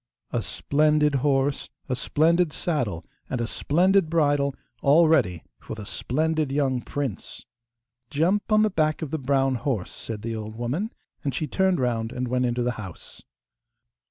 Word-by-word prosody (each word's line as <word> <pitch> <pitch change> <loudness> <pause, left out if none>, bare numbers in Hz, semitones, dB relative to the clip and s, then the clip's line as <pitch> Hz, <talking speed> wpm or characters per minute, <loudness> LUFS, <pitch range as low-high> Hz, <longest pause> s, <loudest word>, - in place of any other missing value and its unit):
A - - 0
splendid 150 0 +2
horse, 140 0 +1 0.2
a 125 - 0
splendid 165 +5 +2
saddle, 125 - -2 0.2
and 125 - -2
a 120 - 0
splendid 180 - +2
bridle, 145 -4 +2 0.3
all 155 +4 +6
ready 110 - +2 0.2
for - - -7
the 105 -2 -8
splendid 155 +5 -1
young 135 -3 +1
prince! 135 -5 -5 0.6
'Jump 185 +9 +1
on 215 0 +5
the 215 - +2
back 155 -2 +1
of 150 - -5
the 160 - -1
brown 135 0 +2
horse,' 125 -6 -2
said 110 -2 -7
the 115 0 -3
old 110 0 -6
woman, 135 - -2 0.3
and 140 -3 -2
she 155 - -1
turned 190 +2 +1
round 115 -3 0
and 125 0 -3
went 125 0 +1
into 120 0 0
the 125 - +1
house. 95 -4 -10
140 Hz, 160 wpm, -25 LUFS, 120-160 Hz, 0.6 s, all